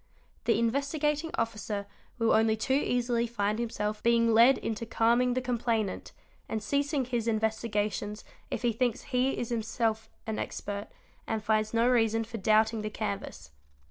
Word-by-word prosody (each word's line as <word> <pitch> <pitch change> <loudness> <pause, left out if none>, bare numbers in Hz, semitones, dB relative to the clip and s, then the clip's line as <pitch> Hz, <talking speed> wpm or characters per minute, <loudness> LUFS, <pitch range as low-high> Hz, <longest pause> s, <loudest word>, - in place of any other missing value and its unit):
The 230 - +3
Investigating 285 +6 0
Officer 210 -3 -2 0.3
will 230 -1 +2
only 220 0 +3
too 260 +4 0
easily 245 -3 +1
find 215 -1 -1
himself 210 -2 -2
being 230 -1 +3
led 235 +4 +7
into 225 0 -3
calming 235 +2 +2
the 255 - +1
complainant 230 -4 -1 0.4
and 220 -1 -2
ceasing 280 +3 0
his 235 -2 -2
investigations 215 -2 -1 0.3
if - - -4
he 240 -1 +2
thinks 240 0 0
he 255 +1 0
is 240 - -3
himself 225 -1 -1 0.2
an 220 -1 -3
expert 205 0 -4 0.4
and 220 -2 -2
finds 215 0 +1
no 230 +1 +3
reason 225 -2 +3
for 225 0 -7
doubting 220 +2 +3
the 215 - -3
canvas. 200 - -5
225 Hz, 150 wpm, -29 LUFS, 215-240 Hz, 0.4 s, led